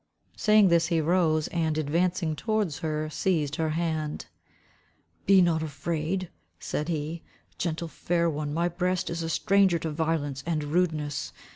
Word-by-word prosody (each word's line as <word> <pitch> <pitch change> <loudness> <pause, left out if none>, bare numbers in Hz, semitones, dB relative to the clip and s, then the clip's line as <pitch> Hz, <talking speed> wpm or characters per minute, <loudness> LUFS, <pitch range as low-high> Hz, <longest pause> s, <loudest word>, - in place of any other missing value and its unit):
Saying 210 -2 +5
this 170 -1 +3
he 165 -2 +1
rose 160 -1 +2
and 160 -2 0
advancing 165 +2 0
towards 210 - -1
her, 155 -1 -2
seized 150 -5 0
her 160 -1 0
hand. 160 -3 -2 1.0
"Be 190 -1 +7
not 165 -2 +2
afraid," 160 +4 -3 0.3
said 150 - -3
he, 160 0 -3 0.4
"gentle 170 0 -2
fair 170 +1 0
one, 150 -2 -2
my 170 +3 +1
breast 180 +1 -1
is 170 0 -3
a 165 - -3
stranger 195 0 +3
to 160 -1 -4
violence 150 -3 -1
and 160 -3 0
rudeness. 150 -3 -1
165 Hz, 145 wpm, -27 LUFS, 155-175 Hz, 1.0 s, Be